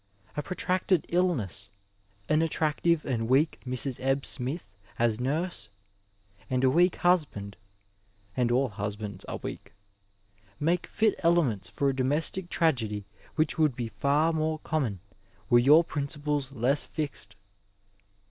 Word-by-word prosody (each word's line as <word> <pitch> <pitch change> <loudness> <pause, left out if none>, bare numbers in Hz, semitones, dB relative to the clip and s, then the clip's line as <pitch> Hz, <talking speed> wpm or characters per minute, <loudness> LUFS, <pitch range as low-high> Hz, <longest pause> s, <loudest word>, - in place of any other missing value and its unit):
A 150 - -1
protracted 185 +1 0
illness, 140 - 0 0.6
an 155 +1 +3
attractive 160 0 +1
and 115 -4 -1
weak 145 +5 +3
Mrs. 130 +1 -1
Ebb 135 +1 +1
Smith 125 - -3 0.2
as 115 -1 +1
nurse, 140 - -2 0.8
and 130 0 0
a 130 - +5
weak 175 +5 +4
husband 145 - +1 0.4
— 100 0 -36
and 120 -1 +1
all 130 +2 +2
husbands 105 -1 -5
are - - -4
weak - - -7 0.5
— 100 0 -33
^make 170 +3 +1
fit 220 -1 +2
elements 150 - +2
for 140 - -1
a 135 - +1
domestic 150 +7 +1
tragedy 115 - 0 0.3
which 155 0 +1
would 150 -5 +3
be 120 -2 -3
far 140 +10 +1
more 155 0 0
common 125 - -1 0.5
were 120 - +7
your 150 +7 +7
principles 145 -2 -2
less 135 +3 +1
fixed. 140 -9 -5
135 Hz, 135 wpm, -28 LUFS, 110-160 Hz, 0.8 s, were